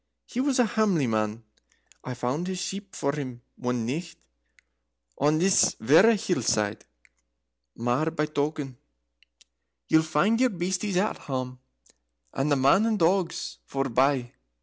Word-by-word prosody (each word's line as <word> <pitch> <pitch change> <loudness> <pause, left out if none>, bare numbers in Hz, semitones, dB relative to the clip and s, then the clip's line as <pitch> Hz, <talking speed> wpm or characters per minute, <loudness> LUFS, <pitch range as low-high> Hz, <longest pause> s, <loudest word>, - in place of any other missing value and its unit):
He 245 - -5
was 270 0 +1
a 250 - +4
hamely 205 -9 +1
man, 110 0 -1 0.6
I 125 - -5
found 130 +8 -2
his 185 -1 -3
sheep 195 +2 -5
for 140 - 0
him 130 -5 -6
one 125 -2 -2
nicht 160 +8 -4 1.0
on 150 +3 +3
this 185 +1 +3
verra 175 - +6
hill 190 - -1
side. 105 -2 0 0.9
Mair 120 +7 0
by 155 -1 -1
token, 145 -3 -3 1.1
ye'll 160 - +5
find 160 +9 +1
your 255 - +4
beasties 185 0 -2
at 205 +4 0
hame, 130 -2 -5 0.7
and 140 +2 -1
the - - +5
men 140 +11 +4
and 220 -2 +1
the 165 - +4
dogs 180 0 -1
forebye." 135 -1 +1
155 Hz, 140 wpm, -26 LUFS, 130-190 Hz, 1.1 s, verra